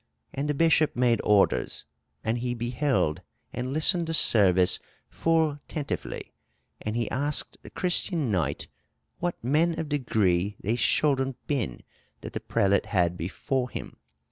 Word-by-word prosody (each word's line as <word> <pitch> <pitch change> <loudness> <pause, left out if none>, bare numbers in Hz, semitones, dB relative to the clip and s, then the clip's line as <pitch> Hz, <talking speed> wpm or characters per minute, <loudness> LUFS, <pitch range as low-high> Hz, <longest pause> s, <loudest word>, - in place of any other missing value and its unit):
And 145 +2 -2
the 150 - +1
bishop 160 0 +3
made 120 -2 +2
orders. 105 -2 +2 0.4
And 115 +2 0
he 120 0 -2
beheld 120 - 0 0.3
and 125 +1 -3
listened 165 +3 +2
the 165 - 0
servyse 95 - +5 0.3
fulle 160 -3 +1
tentyfly: 150 -4 -4 0.6
and 105 +1 -3
he 120 -2 0
asked 145 +3 -1
the - - -11
Cristene 175 - 0
knyght, 80 -7 -1 0.5
what 175 0 -1
men 160 +6 +2
of 160 -2 -4
degree 105 -9 +1
thei 110 +4 +1
scholden 135 +2 +2
ben, 130 - -2 0.4
that - - -8
the - - -3
prelate 100 0 +1
had 90 -3 +1
before 125 +9 -2
him. - - -7
125 Hz, 140 wpm, -27 LUFS, 105-150 Hz, 0.6 s, servyse